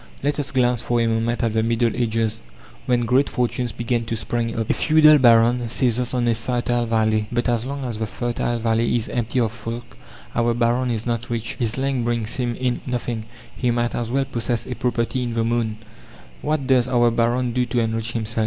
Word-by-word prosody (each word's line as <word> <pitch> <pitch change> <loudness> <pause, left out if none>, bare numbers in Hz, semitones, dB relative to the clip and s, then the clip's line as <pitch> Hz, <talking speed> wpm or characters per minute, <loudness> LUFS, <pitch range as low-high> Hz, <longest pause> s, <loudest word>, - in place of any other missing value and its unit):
Let 145 +1 0
us 145 - -2
glance 125 -3 +1
for 120 0 0
a 115 - +2
moment 115 +2 0
at 115 -2 +1
the 110 - +2
Middle 115 0 +1
Ages, 115 -2 0 0.5
when 125 -1 +2
great 125 +4 +2
fortunes 125 0 -1
began 120 0 -1
to 115 - -2
spring 115 +1 -2
up. 110 - -1
A - - +2
feudal 155 -1 +6
baron 120 -1 +4
seizes 125 0 0
on 120 -1 +1
a 115 - +4
fertile 120 +1 -1
valley. 110 -1 +1
But 120 0 0
as 120 -1 0
long 140 -1 -4
as 115 -3 -4
the 110 - -1
fertile 120 +3 -2
valley 115 +1 +1
is 115 -2 -1
empty 120 +1 -1
of 115 -3 +1
folk 115 +1 -7 0.4
our 120 0 +1
baron 120 +2 +1
is 115 -2 -2
not 120 0 -2
rich. 115 -1 -2
His 115 -1 -1
land 135 -2 0
brings 115 -1 -2
him 120 -2 -1
in 125 0 -1
nothing; 120 -3 -3 0.3
he 125 - 0
might 120 0 0
as 120 -1 -2
well 135 +2 +1
possess 120 -2 -2
a - - -4
property 120 +1 -1
in 120 -2 -3
the 115 - +1
moon. 115 -2 0 0.6
What 150 -2 -1
does 130 -2 +3
our 120 -2 +3
baron 120 +1 +1
do 125 0 +1
to 120 - 0
enrich 115 0 -1
himself? 115 0 -2
120 Hz, 210 wpm, -22 LUFS, 115-125 Hz, 0.6 s, feudal